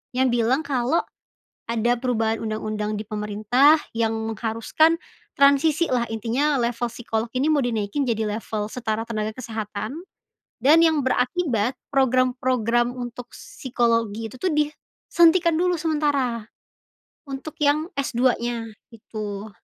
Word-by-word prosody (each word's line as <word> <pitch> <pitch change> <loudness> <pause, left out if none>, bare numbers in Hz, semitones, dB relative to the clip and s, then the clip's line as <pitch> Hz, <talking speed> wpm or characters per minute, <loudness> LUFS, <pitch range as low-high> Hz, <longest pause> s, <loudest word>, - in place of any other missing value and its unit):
Yang 260 0 +3 0.2
bilang 260 +5 +2
kalau 265 +3 +1 0.7
ada 235 +1 +2
perubahan 225 -3 -1
undang-undang 215 -1 -3
di 215 - -5
pemerintah 215 +8 +3 0.2
yang 225 -1 +1 0.2
mengharuskan 230 +10 +1 0.4
transisilah, 280 -3 +3
intinya 245 +7 0
level 240 0 -1
psikologi 230 0 -3
ini 275 - +1
mau 290 -3 +2
dinaikin 225 +2 -1
jadi 225 -4 0
level 210 -2 -3
setara 225 0 -3
tenaga 215 -2 -2
kesehatan. 225 - -5 0.6
Dan 320 +5 +6
yang 315 -2 +3
berakibat, 255 -3 0 0.2
program-program 255 -2 +1
untuk 245 -1 -7
psikologi 230 -3 -1
itu 240 - -12
tuh 360 +5 -1
disuntikan 325 +3 +2
dulu 355 -1 +1
sementara, 290 -7 0 0.8
untuk 280 +4 -7
yang 300 +3 +1
S-2-nya, 240 -3 0 0.2
itu. 210 -1 -7
245 Hz, 115 wpm, -23 LUFS, 225-285 Hz, 0.8 s, Dan